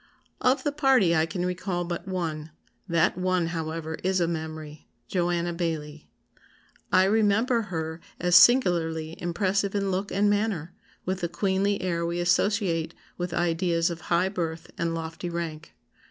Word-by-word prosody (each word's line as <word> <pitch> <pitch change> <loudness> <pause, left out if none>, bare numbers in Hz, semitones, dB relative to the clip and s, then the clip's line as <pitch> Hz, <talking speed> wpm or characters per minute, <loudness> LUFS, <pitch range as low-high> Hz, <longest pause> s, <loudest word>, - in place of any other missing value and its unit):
] - - -38
"Of 270 - -1
the 290 - 0
party 265 - +3
I 160 0 +2
can 180 0 -3
recall 180 0 -2
but 175 +2 -5
one; 165 -5 -3 0.4
that 170 +1 +2
one, 185 -1 +1
however, 160 -1 -4
is 190 0 +1
a 170 - +2
memory, 155 -2 -6 0.2
JOANNA 175 -1 0
BAILLIE. 155 -3 -4 0.8
I 185 - +6
remember 220 +4 +3
her 160 -1 -4 0.2
as 180 0 +2
singularly 170 -8 +5
impressive 195 +3 0
in 200 -1 0
look 190 +2 -2
and 205 +1 +2
manner, 205 -5 0 0.3
with 185 0 -1
the 170 - -1
'queenly' 195 +3 0
air 170 -2 -1
we 170 +1 -2
associate 175 -2 +1 0.2
with 175 0 -2
ideas 170 0 +1
of 170 - -6
high 175 +2 +3
birth 165 -4 -4
and 165 0 -1
lofty 165 +2 -5
rank. 165 -2 -5
175 Hz, 155 wpm, -26 LUFS, 165-190 Hz, 0.8 s, I